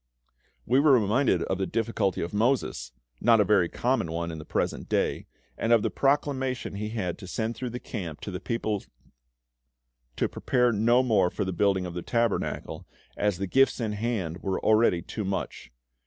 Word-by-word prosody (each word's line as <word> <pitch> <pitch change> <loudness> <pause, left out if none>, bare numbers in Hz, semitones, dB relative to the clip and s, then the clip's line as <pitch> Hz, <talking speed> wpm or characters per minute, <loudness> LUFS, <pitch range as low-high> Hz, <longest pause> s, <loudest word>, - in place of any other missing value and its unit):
We 130 +3 +3
were 145 -1 +5
reminded 105 -4 +2
of 95 - -2
the 95 - 0
difficulty 115 -4 -1
of 85 - -5
Moses 105 - 0 0.3
not 115 -2 +5
a - - +6
very 95 -4 +3
common 125 -9 0
one 85 0 -3
in 80 - -7
the 75 - -9
present - - -2
day - - 0 0.3
and 115 - 0
of 115 -2 +5
the - - 0
proclamation 135 -3 0
he 105 +2 -4
had 95 -6 -3
to 95 - -9
send 110 +4 -2
through 125 +2 -4
the 120 +1 -5
camp 85 -12 -6
to 100 - -5
the 90 - -4
people 110 -4 -2 1.3
to - - +1
prepare 125 -1 +1
no 120 +4 +3
more 105 -7 +3
for 100 - -3
the 95 - -2
building 95 -1 +1
of 90 - -6
the 90 - -4
Tabernacle, 115 +2 -2 0.3
as 105 -3 0
the 100 - -2
gifts 135 +9 +3
in 110 -3 -1
hand 105 -6 -2
were 95 -1 -1
already 110 -6 +3
too 110 - -5
much. 95 -10 -4
105 Hz, 185 wpm, -27 LUFS, 95-120 Hz, 1.3 s, a